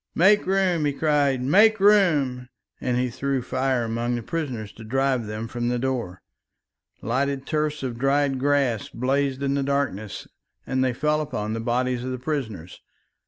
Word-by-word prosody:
"Make 195 +4 +4
room," 185 -5 +2
he 145 - +1
cried, 140 -3 +1
"make 210 +10 +5
room," 155 -12 +3 0.3
and 125 -1 -1
he 125 0 0
threw 135 +1 -2
fire 130 -1 0
among 115 +2 -1
the 120 - -4
prisoners 125 -9 -4
to 115 - -12
drive 130 0 0
them 105 +2 -5
from 120 +1 -3
the 125 - 0
door. 120 -8 -3 0.8
Lighted 135 +4 -1
tufts 150 -1 -1
of 120 -3 -4
dried 135 0 +1
grass 135 -5 +1
blazed 135 +2 -1
in 140 0 +1
the 140 - 0
darkness 135 -8 -2 0.4
and 130 0 0
fell 150 0 +1
upon 110 -7 -3
the 115 - -3
bodies 125 +1 -1
of 130 - -4
the 130 - -3
prisoners. 120 - -5
130 Hz, 165 wpm, -24 LUFS, 120-145 Hz, 0.8 s, make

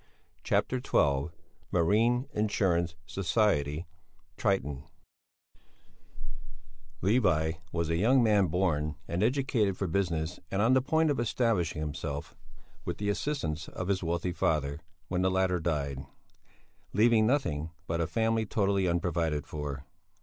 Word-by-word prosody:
CHAPTER 130 - +1
XII 70 - +2 0.4
MARINE 115 +9 +2
INSURANCE 90 -5 +1
SOCIETY 90 -6 0 0.5
"TRITON" 70 0 -1 2.2
Levi 90 -7 +3 0.2
was 85 -1 -1
a 80 - +1
young 120 +7 +4
man 105 -4 +4
born 75 -4 0
and 85 +2 -2
educated 115 -5 +1
for 100 - -1
business 85 -2 -1
and 95 - -1
on 115 +5 +4
the 130 - +5
point 160 +3 +2
of 140 - -1
establishing 105 -9 0
himself 75 -1 -5 0.5
with - - -4
the 105 0 -2
assistance 100 - -2
of 90 +1 -5
his 95 -1 +1
wealthy 85 +1 -1
father, 75 -4 0 0.3
when 90 0 -1
the 95 - +3
latter 95 -1 +1
died, 70 -5 -2 0.9
leaving 110 0 +4
nothing 80 - 0 0.2
but 85 0 -1
a 80 - 0
family 110 +5 +1
totally 100 -2 +1
unprovided 85 -4 0
for. 70 -2 -5
90 Hz, 125 wpm, -30 LUFS, 80-110 Hz, 2.2 s, the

